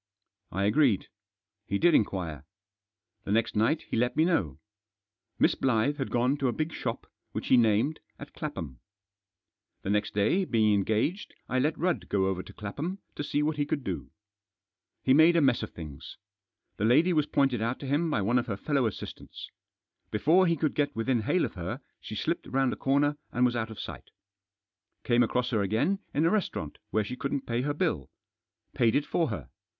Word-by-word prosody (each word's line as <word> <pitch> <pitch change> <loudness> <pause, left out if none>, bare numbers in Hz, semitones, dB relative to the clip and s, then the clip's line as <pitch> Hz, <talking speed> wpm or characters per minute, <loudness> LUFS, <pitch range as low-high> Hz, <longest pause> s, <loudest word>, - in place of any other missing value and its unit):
I 100 - -1
agreed. 115 0 +3 0.6
He 100 - 0
did 175 +9 +4
inquire. 85 - 0 0.8
The - - -4
next 115 +2 +1
night 115 +9 +2
he - - -5
let 120 +2 +1
me 160 - +5
know. 95 - 0 0.8
Miss - - +4
Blyth 130 +3 +1
had 135 - -3
gone 125 +4 +1
to 140 -2 0
a - - +2
big 155 +5 -3
shop, - - -4 0.3
which - - -4
he - - +7
named, 115 +6 +3 0.2
at - - -11
Clapham. 65 -6 -6 1.0
The 95 - -1
next 105 0 0
day, 110 - +2
being 110 - +2
en 100 -1 +2
gaged, 150 - -1
I 130 - 0
let 150 +4 +1
Rudd 175 +2 -1
go 95 -2 +2
over 95 -1 -1
to - - -12
Clapham 145 - -5 0.2
to - - -4
see 145 +1 0
what 155 0 0
he 145 - +1
could 145 -2 -2
do. - - -4 0.9
He 130 - +4
made 160 +4 +6
a - - +5
mess 135 -5 +3
of - - -4
things. 75 -5 -9 0.6
The - - -2
lady 160 +10 +4
was 150 -2 +2
pointed 135 -5 +1
out 115 +3 -1
to - - -5
him 145 +5 +1
by 110 -10 0
one 120 +5 +3
of 120 - -4
her 100 -4 -3
fellow 140 +1 +1
assistants. 110 - -8 0.6
Before 165 - +4
he 170 - +3
could 155 0 0
get 145 -1 0
within 115 +1 +1
hail - - +1
of - - -6
her, - - -5 0.2
she - - -8
slipped - - -2
round 135 -1 +1
a - - -4
corner 145 +2 +1
and 125 +1 +2
was 120 -1 +1
out 110 -1 -2
of 110 - -9
sight - - -8 0.9
Came 120 0 +3
across 125 +1 +1
her 110 -4 +2
again 110 - +1
in 150 +3 +1
a 165 - +3
restaurant 180 - -2
where 110 - +1
she 125 +5 -5
couldn't 140 +1 -3
pay 120 +1 -1
her 145 +3 -1
bilL 130 - -1 0.6
Paid 115 -2 +2
it 145 +1 +2
for 165 +1 +1
her. 105 - -6
125 Hz, 195 wpm, -28 LUFS, 105-150 Hz, 1.0 s, he